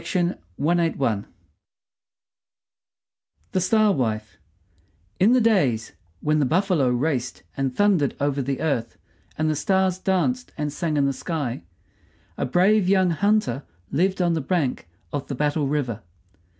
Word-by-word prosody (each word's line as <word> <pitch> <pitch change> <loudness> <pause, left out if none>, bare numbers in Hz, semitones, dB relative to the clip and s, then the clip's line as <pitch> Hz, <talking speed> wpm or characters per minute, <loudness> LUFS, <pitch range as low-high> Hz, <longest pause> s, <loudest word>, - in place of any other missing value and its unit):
THE 160 - 0 2.4
STAR 215 +3 +3
WIFE 110 - -2 0.8
In 210 +6 +5
the 255 - +5
days 140 - +2 0.3
when 155 0 +2
the 145 - +3
buffalo 175 -4 +2
raced 125 0 -1
and 135 -2 -2
thundered 195 -9 +2
over 140 0 0
the 135 +1 -3
earth 125 -8 -1 0.4
and 155 - +1
the 155 - +1
stars 190 +4 +1
danced 220 +8 0
and 150 -1 -2
sang 155 -1 -1
in 140 - +3
the 140 - +1
sky, 140 -5 -3 0.7
a - - -2
brave 185 +6 +3
young 190 -2 +4
hunter 200 - +1 0.3
lived 185 +5 +1
on 175 -1 +2
the 160 - -1
bank 135 - -1 0.2
of 145 -2 -3
Battle 145 +1 0
River. 135 -6 -2
155 Hz, 125 wpm, -24 LUFS, 135-185 Hz, 2.4 s, In